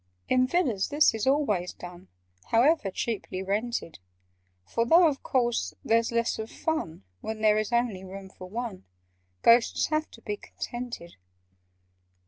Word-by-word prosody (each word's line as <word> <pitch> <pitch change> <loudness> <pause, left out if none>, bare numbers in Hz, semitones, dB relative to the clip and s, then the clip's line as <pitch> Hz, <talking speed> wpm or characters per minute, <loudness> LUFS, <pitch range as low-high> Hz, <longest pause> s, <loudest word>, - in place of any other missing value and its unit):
"In 255 0 +3
Villas 255 - +1
this 295 -2 +4
is 220 +2 -2
always 215 -11 +1
done— 175 - -11 0.4
However 240 -1 +3
cheaply 190 -2 -3
rented: 205 - -2 0.7
For, 230 - 0
though 335 +9 +6
of 285 -3 -2
course 240 -3 0
there's 230 +1 +2
less 235 -1 0
of 220 0 -5
fun 165 - -3 0.2
When 220 0 -5
there 215 -1 +4
is 215 +2 -3
only 235 -6 0
room 190 0 -9
for 185 -1 -11
one, 225 - -5 0.6
Ghosts 230 0 +4
have 310 0 0
to 230 - -15
be 210 0 -3
contented. 240 -10 -7
230 Hz, 140 wpm, -27 LUFS, 195-250 Hz, 0.7 s, though